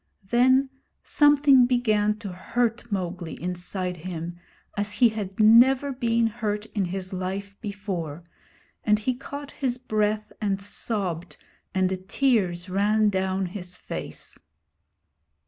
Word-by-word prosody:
Then 260 +6 +3 0.3
something 285 -4 +5
began 215 -4 +2
to 215 -2 -7
hurt 235 +5 -1
Mowgli 180 -3 -3
inside 180 +1 -3
him, 170 0 -6 0.4
as 205 0 -1
he 230 +4 +5
had 205 -3 -6
never 250 +6 +6
been 235 -2 +1
hurt 210 -2 -2
in 200 -3 0
his 185 +1 -5
life 195 +2 -4
before, 190 -7 -5 0.6
and 210 -1 +4
he 215 +5 -1
caught 280 +3 -8
his 255 -3 -2
breath 215 -2 -1
and 200 -2 0
sobbed, 195 -4 -3 0.4
and 190 0 +3
the 185 0 -2
tears 190 -3 0
ran 210 +3 +2
down 190 0 0
his 180 0 -6
face. - - -7
205 Hz, 125 wpm, -25 LUFS, 185-235 Hz, 0.6 s, never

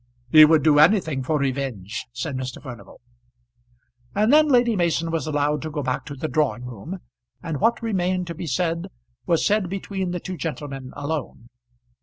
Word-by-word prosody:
"He 155 -1 +10
would 155 -1 +4
do 150 -2 +5
anything 160 -4 +4
for 150 +4 0
revenge," 130 -6 -3
said 130 +4 -4
Mr. 130 -1 -5
Furnival. 120 -8 -11 1.1
And 215 +6 +3
then 305 0 +6
Lady 240 -4 +3
Mason 170 -2 0
was 165 -4 -2
allowed 150 -1 0
to 155 - -4
go 145 -1 -4
back 130 -1 -2
to 145 - -6
the 150 +4 -3
drawing 130 -7 0
room, 125 - -7 0.5
and 160 -4 -3
what 235 0 +2
remained 185 -4 0
to 170 - -5
be 170 +1 -6
said 170 +4 -1 0.4
was 170 -3 +2
said 205 -3 +2
between 190 -1 -3
the 180 0 -3
two 185 +1 -6
gentlemen 135 -3 -5
alone. 145 -5 -5
155 Hz, 175 wpm, -23 LUFS, 135-180 Hz, 1.1 s, He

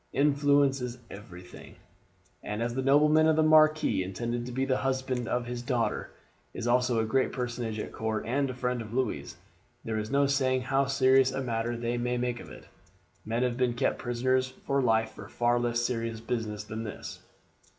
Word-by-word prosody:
Influence 140 -1 +3
is 125 0 -4
everything, 90 -3 -11 0.7
and 105 +2 -3
as 120 0 -2
the 130 - -1
nobleman 150 +3 +4
the 160 - +3
marquis 155 -6 +4
intended 120 +6 -3
to - - -6
be 130 +2 -1
the 130 -1 +1
husband 130 -2 -2
of 125 0 -1
his 120 0 -5
daughter 120 -2 -1 0.5
is 115 - -4
also 125 0 +2
a 110 - +1
great 130 +4 +1
personage 120 -3 -3
at 105 - -5
court 110 -1 -2
and 135 +3 0
a 130 - -5
friend 125 -1 -2
of 110 +1 -8
Louis's, 105 - -2 0.5
there 110 -1 -2
is 105 0 -4
no 140 +1 +3
saying 130 -2 +1
how 135 +1 +1
serious 135 -1 +4
a 135 - -3
matter 120 -1 -2
they 120 +1 -2
may 125 +1 -1
make 120 -1 -2
of - - -10
it. - - -11 0.6
Men 115 +3 0
have 125 -1 -1
been 125 -2 +1
kept - - 0
prisoners 130 +2 0 0.2
for 140 0 +1
life 110 -2 +2
for - - -10
a - - -14
far 120 0 +1
less 120 0 0
serious 115 -2 -2
business 110 -2 -3
than 110 +1 -6
this." 105 - -7
125 Hz, 190 wpm, -29 LUFS, 115-135 Hz, 0.7 s, nobleman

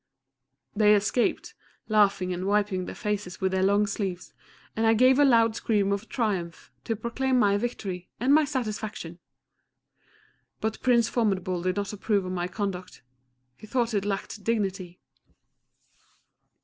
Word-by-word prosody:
They 210 0 +5
escaped, 210 +4 0 0.3
laughing 200 -4 +2
and 180 +2 -4
wiping 200 -2 +1
their - - -7
faces 210 -3 -3
with 190 -1 0
their 190 0 0
long 200 +2 +3
sleeves, 195 -3 -4 0.4
and 225 0 +1
I 225 - +5
gave 255 +4 +5
a - - +6
loud 230 -4 +4
scream 205 -4 +1
of 200 +2 -3
triumph, 185 - -3
to 225 - -1
proclaim 255 +4 -1
my 205 -4 +3
victory, 200 -6 -4
and 260 +4 +3
my 310 +1 +6
satisfaction!... 215 - -4 1.4
But 220 0 -3
Prince 235 -3 +3
Formidable 190 -6 0
did 185 +1 -1
not 205 0 -3
approve 205 -1 0
my 175 -1 -2
conduct 185 - -5 0.5
he 215 - -13
thought 240 -1 0
it 200 -2 0
lacked 200 0 -4
dignity. 195 -5 -2
205 Hz, 140 wpm, -26 LUFS, 190-225 Hz, 1.4 s, a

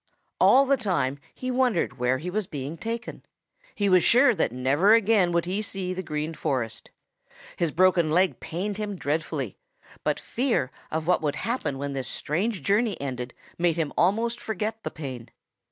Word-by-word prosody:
All 275 +2 +6
the 275 0 +3
time 165 - -1
he 255 0 -4
wondered 245 - +1
where 125 +1 +2
he 180 +6 -5
was 210 -1 -1
being 145 +1 -5
taken. 230 +6 -5 0.5
He 205 -2 +1
was 185 -2 +5
sure 250 +1 +6
that 195 - 0
never 140 - +4
again 210 -5 +3
would 170 0 +1
he 190 +4 -1
see 190 -3 -3
the 185 - -3
Green 155 -2 -3
Forest. 125 -7 -3 0.7
His 170 - 0
broken 175 0 +3
leg 180 +3 +2
pained 190 +5 -4
him 210 -1 -3
dreadfully, 160 -1 -2 0.5
but - - 0
fear 240 - 0 0.2
of 160 0 -2
what 180 +1 +2
would 150 -2 -1
happen 230 - -2
when 140 +1 -3
this 135 -2 -3
strange 190 +8 -2
journey 210 0 +1
ended 125 -3 -5 0.2
made 170 -2 +2
him 160 -3 -2
almost 230 +6 +2
forget 220 0 -3
the - - -3
pain. 130 -6 -7
180 Hz, 170 wpm, -26 LUFS, 145-215 Hz, 0.7 s, All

